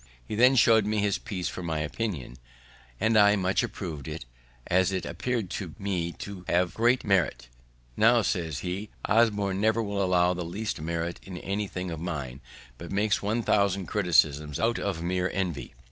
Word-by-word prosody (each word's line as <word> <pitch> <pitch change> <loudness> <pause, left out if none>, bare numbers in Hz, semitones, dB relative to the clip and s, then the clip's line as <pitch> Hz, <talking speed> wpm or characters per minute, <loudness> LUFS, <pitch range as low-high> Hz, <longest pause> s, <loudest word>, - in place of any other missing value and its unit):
He - - -5
then 125 +5 +5
show'd 110 -3 +5
me 110 0 0
his 100 -1 +1
piece 90 -4 -4
for - - -5
my 85 -2 -2
opinion, 75 - -4 0.6
and 110 +1 +2
I 105 -1 +6
much 95 -1 +1
approv'd 80 -8 -5
it, 75 -4 -6 0.4
as 95 +1 +2
it 95 -1 -2
appear'd 120 -7 -2
to 90 -6 -5
me 90 -4 -2
to 100 -3 -8
have 90 0 +2
great 120 +3 +2
merit. 90 - +1 0.5
"Now," 115 +1 +5
says 80 -8 -2
he, 95 +4 -4 0.2
"Osborne 105 -3 +2
never 110 +1 +2
will 100 -1 -2
allow 90 -1 +3
the 90 0 -4
least 100 +1 -4
merit 85 +1 -3
in 95 -2 -8
anything 95 -1 -3
of 80 - -5
mine, 70 -6 -5 0.4
but - - -8
makes 105 +1 +1
1000 100 -3 +1
criticisms 75 -7 +2
out 115 +1 +1
of 90 -5 -3
mere 90 +1 0
envy. 90 -10 -3
95 Hz, 170 wpm, -27 LUFS, 85-105 Hz, 0.6 s, I